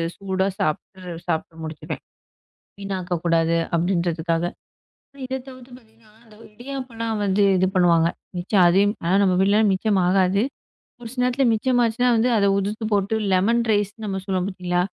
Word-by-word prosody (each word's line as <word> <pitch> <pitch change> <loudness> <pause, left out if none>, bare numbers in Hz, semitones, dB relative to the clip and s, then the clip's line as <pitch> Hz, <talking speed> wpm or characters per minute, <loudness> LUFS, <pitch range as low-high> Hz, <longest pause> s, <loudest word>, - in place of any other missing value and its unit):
சூடா 190 -1 -1
சாப்பிட்டுரு 180 +2 -3
சாப்டு 165 -1 -3
முடிச்சிடுவேன். 155 -1 -6 0.8
வீணாக்கக் 185 -4 -3
கூடாது 165 0 +2 0.2
அப்பிடின்றதுக்காக. 170 -1 0 0.8
இதைத் 260 0 -5
தவிர்த்து 255 -1 -13
பாத்தீங்கன்னா, 220 -2 -25
அந்த 215 -2 -19 0.2
இடியாப்பல்லாம் 240 -3 -5
வந்து 200 +1 +2
இது 185 - +3
பண்ணுவாங்க. 170 -2 +4 0.3
மிச்சம் 185 +1 +3
அதையும் 200 +4 +3
ஆனா, 175 +3 +1
நம்ம 185 -2 +3
வீட்டுலனா 205 +3 +3
மிச்சம் 195 0 +1
ஆகாது. 190 +2 +2 0.6
ஒரு 235 - -8
சில 250 -1 -2
நேரத்துல 250 +1 +1
மிச்சம் 245 +3 +1
ஆச்சுனா, 230 +2 0
வந்து 225 +2 +2
அத 200 -1 +3
உதிர்த்து 210 +3 -3
போட்டு 205 +2 +1 0.2
லெமன் 225 +6 +3
ரைஸ்னு 210 +2 -1
நம்ம 190 -1 -3
சொல்லுவோம், 185 -2 -1
பாத்தீங்களா? 180 -2 -1
195 Hz, 145 wpm, -22 LUFS, 180-225 Hz, 0.8 s, பண்ணுவாங்க